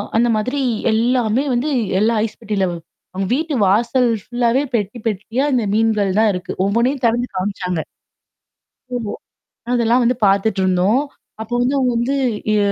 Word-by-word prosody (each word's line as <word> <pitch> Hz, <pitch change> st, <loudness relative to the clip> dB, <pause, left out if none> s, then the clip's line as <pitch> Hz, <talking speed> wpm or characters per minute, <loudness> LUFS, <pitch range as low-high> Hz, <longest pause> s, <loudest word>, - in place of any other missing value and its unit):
அந்த 240 Hz, +2 st, +3 dB
மாதிரி 255 Hz, +6 st, -1 dB, 0.3 s
எல்லாமே 235 Hz, +2 st, +1 dB
வந்து 255 Hz, +6 st, 0 dB, 0.3 s
எல்லா 225 Hz, +2 st, +2 dB
ஐஸ் 215 Hz, -, -8 dB
பெட்டிலவ 195 Hz, -5 st, -1 dB, 0.4 s
அங்க 195 Hz, 0 st, -1 dB
வீட்டு 315 Hz, 0 st, -2 dB
வாசல் 235 Hz, +5 st, +2 dB
ஃபுல்லாவே 245 Hz, +2 st, +1 dB
பெட்டி, 210 Hz, +2 st, -2 dB
பெட்டியா 225 Hz, +6 st, -1 dB
இந்த 240 Hz, -3 st, +2 dB
மீன்கள் 215 Hz, -3 st, +1 dB
தான் 220 Hz, -2 st, +4 dB
இருக்கு. 180 Hz, 0 st, -5 dB
ஒவ்வொண்ணையும் 245 Hz, +6 st, 0 dB
திறந்து 240 Hz, +2 st, +1 dB
காமிச்சாங்க. 185 Hz, -3 st, -2 dB, 1.1 s
ஓ. -, -, -2 dB, 0.8 s
அதெல்லாம் 240 Hz, +1 st, +3 dB
வந்து 245 Hz, +1 st, +2 dB
பாத்துட்ருந்தோம். 195 Hz, +3 st, +2 dB, 0.4 s
அப்போ 225 Hz, +2 st, -6 dB
வந்து 260 Hz, +3 st, +1 dB
அவுங்க 250 Hz, -2 st, +1 dB
வந்து 255 Hz, +4 st, 0 dB, 0.4 s
எ -, -, +3 dB
230 Hz, 135 wpm, -19 LUFS, 205-250 Hz, 1.1 s, தான்